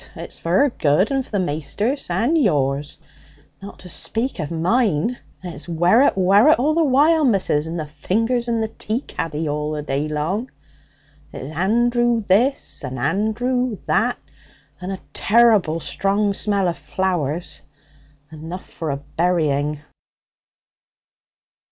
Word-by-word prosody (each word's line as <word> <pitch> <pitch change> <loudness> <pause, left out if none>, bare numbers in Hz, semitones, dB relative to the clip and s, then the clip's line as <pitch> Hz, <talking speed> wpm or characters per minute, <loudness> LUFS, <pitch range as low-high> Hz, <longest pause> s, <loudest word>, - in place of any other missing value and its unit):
It's - - -9
for 180 +11 +2
'er - - +1
good, 160 - +1
and 270 -1 0
for - - -18
the 205 - 0
maister's 180 - -2
and 225 - +1
yours, 145 - 0 0.6
not 200 +1 -10
to 185 - -11
speak 230 +7 -1
of 155 -3 -3
mine. 190 +4 0 0.2
It's 175 -1 -6
werrit, 175 - +3
werrit, 200 +11 +5
all 295 +5 +1
the 330 +1 +2
while, 305 +3 +4
missus, 190 - +2
and 165 +1 -4
the 155 - -3
fingers 230 +10 -1
in 230 -1 0
the 220 - 0
tea 220 +2 -4
caddy 160 - -4
the 150 0 -2
day 140 +2 -1
long! 165 - -2 0.8
It's 135 - -7
Andrew 240 +5 +2
this 235 - +2
and 130 -1 -5
Andrew 220 - 0
that, - - +1 0.6
and 185 +1 -5
a 190 - -5
terrible 210 -7 +3
strong 200 +4 0
smell 200 -2 0
of 170 - -3
flowers 175 -3 -2 0.7
enough 160 +4 -8
for 160 -3 -6
a 140 - -1
burying.' 150 -2 -1
190 Hz, 135 wpm, -21 LUFS, 155-235 Hz, 0.8 s, werrit